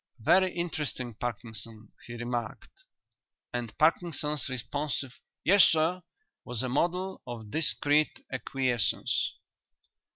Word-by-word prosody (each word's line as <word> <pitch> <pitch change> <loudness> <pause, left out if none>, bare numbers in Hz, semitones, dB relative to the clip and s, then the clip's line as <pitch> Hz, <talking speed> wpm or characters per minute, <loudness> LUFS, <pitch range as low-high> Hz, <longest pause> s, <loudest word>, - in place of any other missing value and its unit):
"Very 185 +11 +4
interesting, 150 -8 -2
Parkinson," 110 -1 -6 0.2
he 120 - -6
remarked, 120 -1 -5 0.7
and 120 -3 -4
Parkinson's 150 -3 +1
responsive 130 +2 -3 0.3
"Yes, 195 +2 +7
sir" 165 +3 +3 0.4
was 125 0 -3
a 130 - -1
model 180 +8 0
of 115 -3 -7
discreet 150 0 +2
acquiescence. 125 -5 0
130 Hz, 95 wpm, -29 LUFS, 120-160 Hz, 0.7 s, Yes